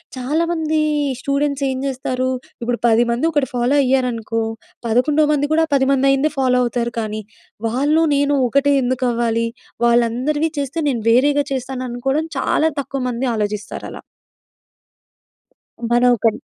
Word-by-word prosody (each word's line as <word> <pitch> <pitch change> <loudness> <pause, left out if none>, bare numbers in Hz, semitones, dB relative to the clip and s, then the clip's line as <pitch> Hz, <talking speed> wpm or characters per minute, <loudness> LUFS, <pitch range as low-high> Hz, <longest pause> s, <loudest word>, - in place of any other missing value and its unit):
చాలామంది 315 +4 0 0.4
స్టూడెంట్స్ 280 +1 -1
ఏం 260 - -2
చేస్తారు. 255 -1 -2 0.3
ఇప్పుడు 240 0 -1
పదిమంది 235 +4 +2
ఒకటి 290 -3 +1
ఫాలో 245 +3 +1
అయ్యారనుకో. 245 -4 0 0.4
పదకొండో 290 +7 +2
మంది 290 0 +1
కూడా 320 +1 +3
ఆ - - -32
పదిమంది 270 0 +2
అయ్యిందే 275 +3 +2
ఫాలో 255 -1 +2
అవుతారు 235 -1 -2
కానీ 215 -1 -3 0.5
వాళ్ళు 285 +7 +2
నేను 285 0 +2
ఒకటే 280 +3 +2
ఎందుకు 255 0 -1
అవ్వాలి? 230 -1 0 0.4
వాళ్ళందరివి 245 +7 +1
చేస్తే 280 +4 -3
నేను 235 -5 -2
వేరేగా 285 +4 +3
చేస్తాను 255 0 -4
అనుకోవడం 270 +6 -1
చాలా 315 +3 +2
తక్కువ 275 0 -5
మంది 245 +2 -2
ఆలోచిస్తారు 210 0 -4
అలా. - - -9 1.9
మన 240 - +4
ఒకరి 225 -1 0
260 Hz, 130 wpm, -19 LUFS, 235-285 Hz, 1.9 s, మన